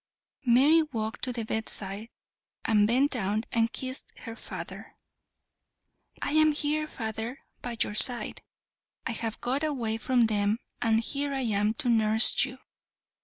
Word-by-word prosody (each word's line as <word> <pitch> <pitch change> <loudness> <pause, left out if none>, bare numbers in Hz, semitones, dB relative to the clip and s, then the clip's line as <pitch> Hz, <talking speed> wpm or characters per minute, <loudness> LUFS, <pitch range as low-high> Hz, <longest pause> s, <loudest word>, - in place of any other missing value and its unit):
Mary 280 +7 +5
walked 225 -8 -5
to 255 - 0
the 230 -2 -4
bedside 215 -1 -4 0.6
and 210 -2 +3
bent 260 +5 +2
down 215 -3 -1
and 230 0 +1
kissed 260 0 -5
her 230 - -8
father. - - -9 1.3
"I - - -2
am 310 0 +4
here, 305 +1 0
father, 225 -1 -5 0.2
by 240 -2 -5
your - - -5
side. 245 +3 +5 0.6
I - - -2
have 225 -1 -4
got 265 +5 -1
away 240 -8 -1
from 245 -1 +2
them, 210 -1 0 0.2
and 225 -1 +2
here 280 +3 -3
I 270 - -1
am 210 -2 0
to 300 -4 -4
nurse 220 -1 +4
you." 260 -1 -9
235 Hz, 145 wpm, -28 LUFS, 220-270 Hz, 1.3 s, Mary